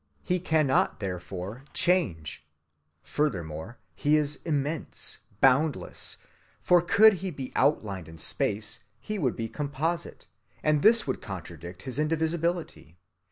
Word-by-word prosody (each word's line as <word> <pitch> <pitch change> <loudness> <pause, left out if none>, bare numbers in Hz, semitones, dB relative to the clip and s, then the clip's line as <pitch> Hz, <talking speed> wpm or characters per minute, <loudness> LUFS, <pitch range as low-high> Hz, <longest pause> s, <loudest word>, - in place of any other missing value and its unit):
He 180 0 +1
cannot, 155 -9 +2
therefore, 95 +4 -5
change. 85 - 0 0.6
Furthermore, 95 - -2 0.2
He 145 - +3
is 150 -1 0
immense, 150 -1 -2 0.2
boundless; 135 +3 +2 0.4
for 175 -1 +5
could 215 +5 +6
He 190 - -2
be 135 -6 -6
outlined 100 - +1
in 80 - -11
space, 105 +6 -1 0.2
He 210 - -4
would 130 -8 +1
be 115 - -3
composite, 150 +6 -3 0.4
and 150 -1 +3
this 230 +4 +6
would 130 - -2
contradict 90 -2 -8
his 130 0 -4
indivisibility. 160 - -1
140 Hz, 115 wpm, -28 LUFS, 95-160 Hz, 0.6 s, could